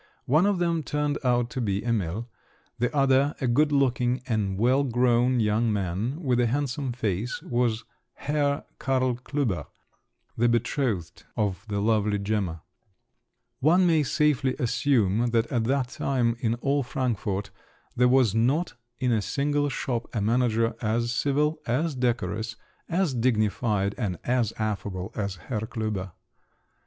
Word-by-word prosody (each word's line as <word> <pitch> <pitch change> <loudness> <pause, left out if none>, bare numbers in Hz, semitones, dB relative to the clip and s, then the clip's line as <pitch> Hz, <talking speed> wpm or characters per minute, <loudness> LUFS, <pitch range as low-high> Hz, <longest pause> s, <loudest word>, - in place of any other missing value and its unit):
One 155 +9 +4
of 205 -2 +2
them 170 -2 +1
turned 150 -1 -1
out 120 -1 +1
to 130 - -3
be 100 -1 -1
Emil; 110 -1 -1 0.5
the 125 - +1
other, 135 0 +3
a 130 - -1
good 145 +5 +3
looking 125 -2 +1
and 105 -6 -1
well 130 +6 +3
grown 125 0 +2
young 110 +1 +2
man, 100 - -2
with 125 -3 +2
a 120 - +3
handsome 135 +1 -1
face, 115 -1 -2
was 120 -2 0 0.3
Herr 145 -1 -1
Karl 130 -2 +1
Klüber, 125 -6 -2 0.7
the 120 +1 +2
betrothed 120 - -1
of 100 -1 -1
the 100 -1 -2
lovely 105 -1 +2
Gemma. 100 -5 -2 1.0
One 175 +7 +4
may 165 -3 +4
safely 140 -2 +1
assume 120 -3 +2
that 115 -1 +2
at 120 -4 +1
that 130 0 0
time 125 -4 0
in 115 -1 0
all 140 +4 0
Frankfort, 110 -6 -2 0.4
there 125 +1 +4
was 125 -5 +4
not 130 +10 +1 0.2
in 125 0 0
a 110 -2 +2
single 145 +4 0
shop 120 -3 -3
a - - +1
manager 115 +1 +2
as 115 +1 0
civil, 145 +5 +1
as 145 +7 0
decorous, 115 -3 -1 0.3
as 175 -3 +1
dignified, 110 -4 +1
and 95 -7 -2
as 120 -3 +1
affable 100 -4 -3
as 100 -3 -3
Herr 110 +4 -4
Klüber. 110 -5 -4
120 Hz, 145 wpm, -26 LUFS, 110-135 Hz, 1.0 s, One